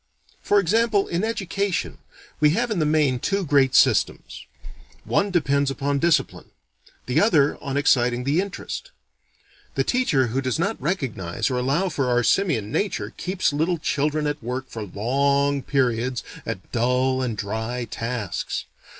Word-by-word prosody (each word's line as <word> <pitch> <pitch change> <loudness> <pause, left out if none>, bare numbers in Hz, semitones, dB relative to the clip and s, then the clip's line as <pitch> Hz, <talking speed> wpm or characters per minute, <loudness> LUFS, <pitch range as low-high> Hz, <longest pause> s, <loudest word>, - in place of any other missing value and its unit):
For 205 - +3
example, 210 +2 +2
in 175 +3 -1
education, 200 -3 -2 0.4
we 150 - +5
have 240 0 0
in 205 - 0
the 155 - +2
main 150 -5 +2
two 195 +7 -1
great 135 -3 +3
systems. - - +2 0.6
One 200 0 +1
depends 140 -6 +1
upon 140 +1 -1
discipline. 170 +1 +1 0.6
The 125 - +2
other 155 -9 +3
on 140 -2 -3
exciting 125 -3 +2
the 145 +7 +2
interest. 200 - -6 0.9
The - - +2
teacher 245 - +2
who 135 - +1
does 130 -2 -1
not 200 +7 -1
recognize 135 - -2
or 125 - 0
allow 140 +10 +1
for 135 -6 -1
our 120 0 +2
simian 120 - +1
nature, 205 - -2
keeps 185 -4 -1
little 165 +4 +1
children 150 0 -1
at 145 0 -2
work 125 +3 -4
for 115 - -7
long 140 +7 +1
periods 125 -2 0 0.2
at - - -6
dull 125 +2 +1
and 120 -4 -2
dry 110 +4 -3
tasks. 115 -3 -4
140 Hz, 150 wpm, -23 LUFS, 125-175 Hz, 0.9 s, we